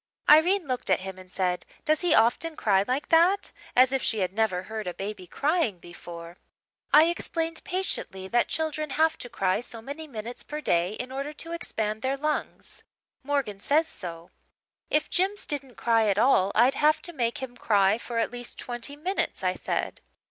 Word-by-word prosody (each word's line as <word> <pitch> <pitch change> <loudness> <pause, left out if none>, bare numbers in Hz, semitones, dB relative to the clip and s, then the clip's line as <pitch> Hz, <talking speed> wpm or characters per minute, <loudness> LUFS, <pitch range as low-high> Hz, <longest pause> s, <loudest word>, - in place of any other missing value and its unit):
"Irene 345 +5 +6
looked 255 -5 -2
at 185 - +3
him 190 0 -7
and 185 -1 -14
said, 180 -2 -1 0.2
'Does 310 0 +2
he 355 - +3
often 310 +8 +3
cry 195 -6 +2
like 260 +3 -1
that?' 345 +5 +4 0.2
as 255 +1 +6
if 270 -1 0
she 220 -3 +1
had 185 0 -1
never 200 -4 0
heard 215 -1 -6
a 180 - -4
baby 195 -2 -6
crying 295 - 0
before. 170 0 -10 0.5
"I 300 - +8
explained 330 -1 -1
patiently 345 - -2
that 240 +4 +2
children 310 -1 -2
have 320 0 +3
to 245 - -6
cry 195 -5 0
so 235 -1 -7
many 285 +7 -7
minutes 235 -2 -7
per 300 - -6
day 175 - +1
in 250 +3 -6
order 275 +3 -4
to 330 +2 -6
expand 220 -10 -3
their 265 +2 -1
lungs. 300 +2 -3 0.4
Morgan 265 -8 -2
says 310 +9 +2
so. 170 -2 -8 0.6
"'If 300 - +2
Jims 390 +3 +1
didn't 275 -4 -2
cry 225 -2 +2
at 200 -1 +2
all 205 -5 +4
I'd 245 +4 +5
have 305 +1 +2
to 345 - -4
make 235 -5 -1
him 260 -2 -6
cry 205 -2 +3
for 235 0 -5
at 230 - +1
least 245 0 -6
twenty 240 +3 -4
minutes,' 360 +7 -2
I - - +2
said. - - -3
245 Hz, 185 wpm, -27 LUFS, 200-305 Hz, 0.6 s, I